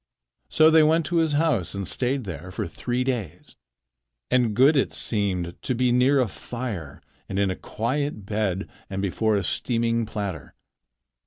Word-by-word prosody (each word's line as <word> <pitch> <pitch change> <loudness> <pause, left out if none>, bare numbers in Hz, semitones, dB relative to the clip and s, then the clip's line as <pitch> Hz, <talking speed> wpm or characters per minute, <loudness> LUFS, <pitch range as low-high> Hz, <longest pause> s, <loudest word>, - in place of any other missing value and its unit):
So 155 0 +5
they 160 0 +7
went 160 +1 +3
to 175 - -1
his 160 -2 +2
house 145 - +1
and 100 -2 -3
stayed 130 +1 0
there 85 -2 -7
for 90 - -4
three 120 +8 -2
days. 120 - -4 0.8
And 120 -4 +2
good 135 +6 +5
it 135 - +1
seemed 90 -5 -1
to 130 - -1
be 125 +1 +2
near 130 +3 +4
a 125 - +2
fire 110 - -6 0.3
and 95 - -3
in 100 -1 +2
a - - -3
quiet 130 -1 -3
bed 100 -2 -1 0.2
and 95 - -4
before 110 +3 +1
a 100 - 0
steaming 115 -1 0
platter. 100 -10 -5
115 Hz, 165 wpm, -25 LUFS, 100-130 Hz, 0.8 s, they